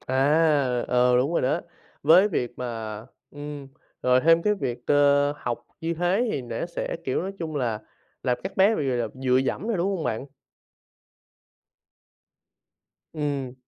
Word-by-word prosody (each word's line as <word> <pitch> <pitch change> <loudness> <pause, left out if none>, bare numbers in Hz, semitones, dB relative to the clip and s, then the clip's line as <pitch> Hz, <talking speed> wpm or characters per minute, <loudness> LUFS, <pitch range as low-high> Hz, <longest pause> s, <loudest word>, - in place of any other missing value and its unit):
À, 140 -2 +2
ờ, 125 0 +4
đúng 135 +6 +1
rồi - - +1
đó. 150 +6 +1 0.4
Với 175 +7 +6
việc 125 - -3
mà 115 -4 -5 0.3
ừm, 145 -1 -8 0.3
rồi 125 0 +4
thêm 165 +2 +4
cái 210 +2 +2
việc 125 -8 -5
cơ 145 0 +4
học 120 -4 -5
như 165 +1 -2
thế 180 +8 +1
thì 135 - -2
nẻ 120 +4 -4
sẽ, 175 - -4
kiểu, 130 - -1
nói 195 - -4
chung 160 -3 -4
là 115 -6 -1 0.4
làm 125 -2 0
các 190 0 -5
bé 200 +4 +5
bị, 140 - -1
gọi 125 - 0
là, 120 -1 0
dựa 130 -1 +1
dẫm 135 - -1
nè, 230 - +1
đúng 175 +2 0
hông 165 - -4
bạn? 115 +5 -2 2.9
Ừm. 140 -4 -3
140 Hz, 160 wpm, -25 LUFS, 125-165 Hz, 2.9 s, Với